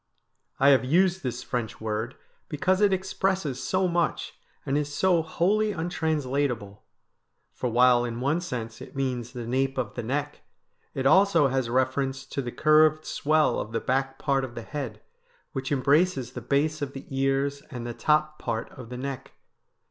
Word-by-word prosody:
I 135 Hz, -, +6 dB
have 135 Hz, -2 st, +5 dB
used 180 Hz, +7 st, +2 dB
this 125 Hz, -3 st, -4 dB
French 120 Hz, -4 st, -3 dB
word 110 Hz, +3 st, -3 dB, 0.3 s
because 185 Hz, +6 st, +1 dB
it 205 Hz, -1 st, +5 dB
expresses 190 Hz, -6 st, -1 dB
so 185 Hz, 0 st, +1 dB
much, 170 Hz, -1 st, -1 dB, 0.3 s
and 135 Hz, -, 0 dB
is 145 Hz, 0 st, -1 dB
so 175 Hz, +2 st, +3 dB
wholly 205 Hz, +7 st, +1 dB
untranslatable; 140 Hz, -, -2 dB, 0.7 s
for 125 Hz, -, -2 dB
while 120 Hz, +1 st, +5 dB
in 120 Hz, -1 st, -4 dB
one 145 Hz, +7 st, +1 dB
sense 115 Hz, -9 st, -5 dB
it -, -, -11 dB
means 125 Hz, -3 st, -2 dB
the 120 Hz, -2 st, -6 dB
nape 135 Hz, +3 st, 0 dB
of -, -, -2 dB
the 120 Hz, -, -4 dB
neck, 145 Hz, +5 st, -3 dB, 0.5 s
it 135 Hz, -, -2 dB
also 170 Hz, -2 st, +5 dB
has 130 Hz, -2 st, -1 dB
reference 135 Hz, +2 st, 0 dB
to 140 Hz, -, -4 dB
the 120 Hz, -2 st, -5 dB
curved 155 Hz, +1 st, +4 dB
swell 155 Hz, +1 st, +2 dB
of 110 Hz, -, -5 dB
the 115 Hz, -, +1 dB
back 135 Hz, +1 st, -1 dB
part 135 Hz, -2 st, +1 dB
of 120 Hz, -2 st, -6 dB
the 115 Hz, -, -6 dB
head, 120 Hz, -6 st, -6 dB, 0.5 s
which 135 Hz, +1 st, -4 dB
embraces 140 Hz, -1 st, +2 dB
the 125 Hz, -, -7 dB
base 150 Hz, +5 st, 0 dB
of 140 Hz, -1 st, -3 dB
the 135 Hz, -, -8 dB
ears 135 Hz, +1 st, 0 dB
and 120 Hz, -3 st, -6 dB
the 120 Hz, -, -4 dB
top 155 Hz, +3 st, +1 dB
part 115 Hz, -1 st, -3 dB
of 125 Hz, -3 st, -11 dB
the 125 Hz, -, -6 dB
neck. 135 Hz, 0 st, -6 dB
135 Hz, 170 wpm, -26 LUFS, 125-155 Hz, 0.7 s, I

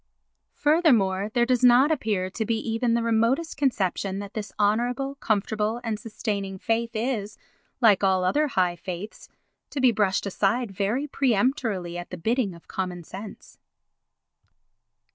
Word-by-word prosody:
Furthermore 230 Hz, -, +3 dB
there 240 Hz, -1 st, +4 dB
does 250 Hz, 0 st, +1 dB
not 250 Hz, +5 st, +6 dB
appear 205 Hz, -10 st, -1 dB
to 220 Hz, -, -2 dB
be 225 Hz, +1 st, 0 dB
even 230 Hz, +1 st, 0 dB
the 235 Hz, -, 0 dB
remotest 230 Hz, +8 st, +1 dB
conception 195 Hz, -8 st, 0 dB
that 200 Hz, 0 st, -7 dB
this 215 Hz, -2 st, -5 dB
honourable, 240 Hz, +6 st, +1 dB
comfortable 220 Hz, -2 st, -1 dB
and 220 Hz, -3 st, -2 dB
sustaining 200 Hz, -3 st, -4 dB
faith 230 Hz, +4 st, -1 dB
is, 215 Hz, -3 st, -2 dB, 0.4 s
like 210 Hz, -4 st, +5 dB
all 190 Hz, -1 st, +3 dB
other 295 Hz, +12 st, +2 dB
high 180 Hz, -8 st, +1 dB
faiths, 180 Hz, +4 st, -7 dB, 0.4 s
to 285 Hz, -, -4 dB
be 255 Hz, -2 st, +5 dB
brushed 205 Hz, -3 st, +1 dB
aside 200 Hz, +4 st, 0 dB
very 205 Hz, +8 st, -1 dB
peremptorily 225 Hz, -, 0 dB
at 175 Hz, -, -8 dB
the 180 Hz, -, -6 dB
bidding 220 Hz, +1 st, 0 dB
of 170 Hz, -, -17 dB
common 180 Hz, -2 st, -4 dB
sense. 200 Hz, +5 st, -10 dB
220 Hz, 145 wpm, -25 LUFS, 195-245 Hz, 0.4 s, not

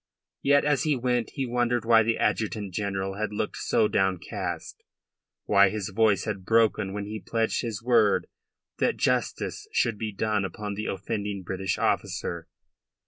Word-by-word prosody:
Yet, 140 Hz, +1 st, +4 dB
as 145 Hz, -4 st, +2 dB
he 155 Hz, -2 st, +2 dB
went, 125 Hz, -2 st, 0 dB
he 135 Hz, -, -1 dB
wondered 120 Hz, -1 st, 0 dB
why 115 Hz, -1 st, +6 dB
the 115 Hz, +1 st, +1 dB
Adjutant 105 Hz, -3 st, -1 dB
General 95 Hz, 0 st, -2 dB
had 110 Hz, -1 st, -1 dB
looked 105 Hz, -, -3 dB
so 105 Hz, -, +2 dB
downcast, 95 Hz, -4 st, -2 dB, 0.6 s
why 100 Hz, -1 st, +5 dB
his 105 Hz, 0 st, -3 dB
voice 105 Hz, 0 st, +2 dB
had 100 Hz, -4 st, -3 dB
broken 110 Hz, -2 st, +2 dB
when 100 Hz, +1 st, -4 dB
he 110 Hz, +1 st, -5 dB
pledged 115 Hz, +4 st, -1 dB
his 115 Hz, -3 st, -4 dB
word 115 Hz, -4 st, +3 dB, 0.5 s
that -, -, +1 dB
justice -, -, -1 dB
should 115 Hz, -3 st, +1 dB
be 110 Hz, -1 st, -3 dB
done 105 Hz, 0 st, 0 dB
upon 105 Hz, +2 st, -4 dB
the 105 Hz, +2 st, -4 dB
offending 100 Hz, 0 st, -3 dB
British 95 Hz, +1 st, -2 dB
officer. 85 Hz, -1 st, -1 dB
105 Hz, 155 wpm, -27 LUFS, 100-115 Hz, 0.6 s, why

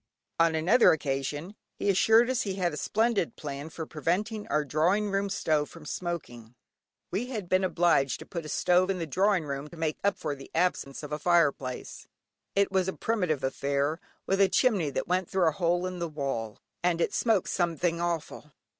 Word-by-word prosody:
On 165 Hz, -1 st, +4 dB
another 180 Hz, +9 st, +5 dB
occasion, 145 Hz, +4 st, -3 dB, 0.2 s
he -, -, -3 dB
assured 220 Hz, +4 st, +5 dB
us 255 Hz, -, 0 dB
he 195 Hz, -2 st, -2 dB
had 180 Hz, -4 st, 0 dB
a -, -, -5 dB
splendid 220 Hz, -3 st, 0 dB
plan 145 Hz, 0 st, -6 dB
for 160 Hz, 0 st, -6 dB
preventing 200 Hz, +8 st, -2 dB
our 150 Hz, 0 st, 0 dB
drawing 180 Hz, +8 st, +1 dB
room 195 Hz, 0 st, 0 dB
stove 155 Hz, -6 st, 0 dB
from 165 Hz, -2 st, -13 dB
smoking. 125 Hz, -10 st, -5 dB, 0.6 s
We 210 Hz, +7 st, -2 dB
had 215 Hz, -8 st, -5 dB
been 185 Hz, +2 st, +2 dB
obliged 170 Hz, -8 st, +2 dB
to -, -, -11 dB
put 170 Hz, -3 st, -5 dB
a 155 Hz, -, -8 dB
stove 180 Hz, +4 st, +3 dB
in 195 Hz, -, 0 dB
the 170 Hz, -, -3 dB
drawing 185 Hz, +2 st, +1 dB
room 140 Hz, 0 st, -4 dB
to 170 Hz, -, -13 dB
make 160 Hz, -1 st, -2 dB
up 200 Hz, 0 st, +2 dB
for -, -, -3 dB
the 135 Hz, -1 st, -11 dB
absence 165 Hz, -5 st, 0 dB
of 150 Hz, -, -7 dB
a 150 Hz, -, -2 dB
fire 170 Hz, -3 st, +4 dB
place; 130 Hz, -2 st, -8 dB, 0.5 s
it 200 Hz, 0 st, +2 dB
was 190 Hz, -1 st, +1 dB
a 190 Hz, -, -1 dB
primitive 180 Hz, -11 st, -1 dB
affair, 140 Hz, +3 st, -1 dB, 0.3 s
with 195 Hz, +1 st, +1 dB
a 195 Hz, -, +5 dB
chimney 205 Hz, -, +2 dB
that 140 Hz, -, -3 dB
went 180 Hz, 0 st, 0 dB
through 190 Hz, -3 st, +2 dB
a -, -, +4 dB
hole 175 Hz, +2 st, 0 dB
in 185 Hz, -1 st, -4 dB
the 170 Hz, -1 st, -2 dB
wall, 135 Hz, -8 st, -3 dB, 0.3 s
and 175 Hz, -1 st, +2 dB
it 195 Hz, -, 0 dB
smoked 220 Hz, -5 st, +1 dB
"somethink 170 Hz, -1 st, 0 dB
hawful." 165 Hz, -3 st, -3 dB
170 Hz, 200 wpm, -28 LUFS, 150-190 Hz, 0.6 s, another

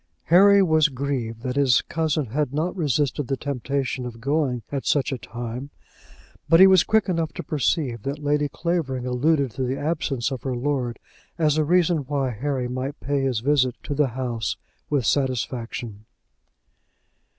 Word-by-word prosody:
Harry 200 Hz, +2 st, +7 dB
was 160 Hz, -3 st, +4 dB
grieved 125 Hz, -4 st, -3 dB
that 130 Hz, -1 st, -3 dB
his 135 Hz, -4 st, +3 dB
cousin 155 Hz, -2 st, -1 dB
had 145 Hz, 0 st, 0 dB
not 170 Hz, +5 st, -1 dB
resisted 145 Hz, -4 st, 0 dB
the 135 Hz, -, -1 dB
temptation 135 Hz, -1 st, -2 dB
of 120 Hz, -2 st, -7 dB
going 135 Hz, -2 st, 0 dB
at 140 Hz, -2 st, -2 dB
such 145 Hz, -2 st, +1 dB
a 130 Hz, -, -2 dB
time, 120 Hz, +4 st, -6 dB, 0.8 s
but 165 Hz, -, +6 dB
he 190 Hz, -, +10 dB
was 190 Hz, -2 st, +6 dB
quick 220 Hz, -1 st, +2 dB
enough 165 Hz, -4 st, -1 dB
to -, -, -7 dB
perceive 145 Hz, -, -1 dB
that 140 Hz, +6 st, -3 dB
Lady 145 Hz, 0 st, 0 dB
Clavering 145 Hz, -7 st, -2 dB
alluded 135 Hz, +2 st, +1 dB
to 130 Hz, -, -6 dB
the 130 Hz, +1 st, -1 dB
absence 145 Hz, -5 st, -1 dB
of 130 Hz, -3 st, -4 dB
her 130 Hz, -2 st, -3 dB
lord 125 Hz, -2 st, -2 dB, 0.4 s
as 155 Hz, -3 st, +2 dB
a 155 Hz, -, +2 dB
reason 175 Hz, +1 st, +3 dB
why 135 Hz, -2 st, -2 dB
Harry 130 Hz, +2 st, -2 dB
might 130 Hz, +3 st, -4 dB
pay 140 Hz, 0 st, -1 dB
his 130 Hz, -5 st, 0 dB
visit 130 Hz, -2 st, +2 dB
to 145 Hz, -, -3 dB
the 145 Hz, 0 st, +2 dB
house 120 Hz, -3 st, -3 dB, 0.3 s
with 140 Hz, -5 st, +1 dB
satisfaction. 120 Hz, -5 st, -2 dB
140 Hz, 165 wpm, -24 LUFS, 125-150 Hz, 0.8 s, he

